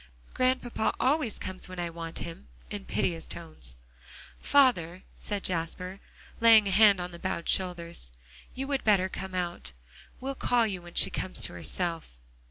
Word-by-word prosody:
"Grandpapa 255 -3 +1
always 265 -4 +1
comes 185 0 -6
when 185 -1 -7
I 170 -1 -2
want 165 0 -6
him," 170 +3 -7 0.2
in 205 -2 -5
piteous 165 -2 -1
tones. 155 - -6 0.7
"Father," 190 -11 +3
said 205 -2 -3
Jasper, 180 +2 -2 0.4
laying 225 -2 +7
a - - 0
hand 200 -1 +6
on 180 0 -4
the 170 - -10
bowed 170 - -3
shoulders, 170 - 0 0.4
"you 265 - -3
would 275 -1 -1
better 195 -3 +4
come 190 0 -6
out. 175 - -3 0.5
We'll 270 +1 -3
call 245 -3 +2
you 190 -4 -3
when 175 0 -13
she - - +5
comes 185 -10 -2
to 100 - +1
herself." 165 - -3
185 Hz, 160 wpm, -29 LUFS, 170-220 Hz, 0.7 s, laying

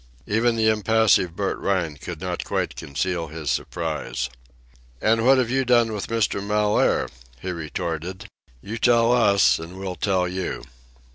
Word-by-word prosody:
Even 115 +3 +1
the 110 -1 +2
impassive 110 -5 +3
Bert 100 +1 -2
Rhine 90 -6 -1
could 80 +3 -8
not 90 -1 -3
quite - - -2
conceal 85 +4 -3
his 80 -1 -4
surprise. 65 0 -3 0.7
"An' 115 - +2
what 135 +2 +6
have 125 -2 +1
you 135 0 +2
done 120 -3 +3
with 105 - -4
Mr. 115 -3 0
Mellaire!" 105 0 +2 0.3
he 95 - -4
retorted. 85 +2 -4 0.4
"You 115 +3 -5
tell 115 0 +4
us, 100 - +4
an' 85 +3 -9
we'll 95 -1 -4
tell 95 -2 +1
you." 90 0 -4
100 Hz, 150 wpm, -23 LUFS, 85-115 Hz, 0.7 s, what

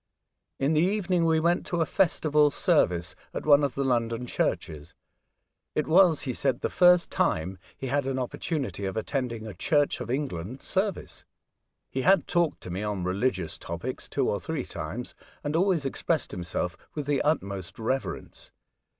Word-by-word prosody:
In 140 +4 +1
the 155 - +4
evening 185 -2 +1
we 160 -1 +3
went 170 +2 +2
to 175 - -1
a 165 - +3
festival 150 -5 +3
service 90 - +1 0.2
at - - -4
one 145 -1 +6
of 140 -3 0
the 140 - 0
London 120 -2 0
churches. 75 -10 -2 0.8
It 150 - +1
was, 170 -1 +5
he 130 - -2
said, 130 0 0
the - - -1
first 180 -1 +5
time 90 +4 0 0.2
he - - -6
had 140 +1 0
an 135 -1 -1
opportunity 130 - -3
of 95 +3 -3
attending 115 -1 -2
a 110 - -6
Church 145 - +1
of - - -5
England 130 - -3
service. 195 0 -2 0.6
He 130 - -3
had 190 +7 +4
talked 170 -3 +1
to 90 - -7
me 95 +3 -3
on 105 -3 -2
religious 95 -2 -1
topics 85 0 -5
two - - 0
or - - 0
three - - -3
times, - - -6 0.3
and 145 +2 -2
always 175 -4 +2
expressed 155 +4 -1
himself 90 -2 -3 0.2
with 150 -2 -3
the 145 -1 +1
utmost 100 - -1
reverence. 130 +4 -3
135 Hz, 165 wpm, -27 LUFS, 105-160 Hz, 0.8 s, one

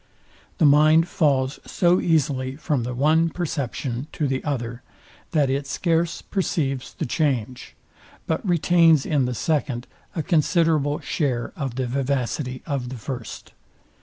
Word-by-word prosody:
The 165 - +3
mind 155 +3 +5
falls 140 -6 +1
so 175 -1 +2
easily 135 -5 0
from 150 -3 -1
the 125 +1 -4
one 155 +5 +3
perception 145 -6 -3
to 150 - -1
the 130 -1 -2
other, 120 -4 -3 0.5
that 150 -4 +2
it 135 +1 -1
scarce 165 +2 0
perceives 140 -9 -2
the - - -3
change, 125 -4 -2 0.5
but 160 - -1
retains 170 -4 +4
in 145 -4 +1
the 125 0 -2
second 135 -4 -1 0.3
a 160 - -1
considerable 155 -3 +2
share 125 -6 -2
of 135 -6 -4
the 130 0 -1
vivacity 130 0 -2
of 140 -5 -3
the 130 - -6
first. 120 -1 -7
140 Hz, 135 wpm, -23 LUFS, 130-160 Hz, 0.5 s, mind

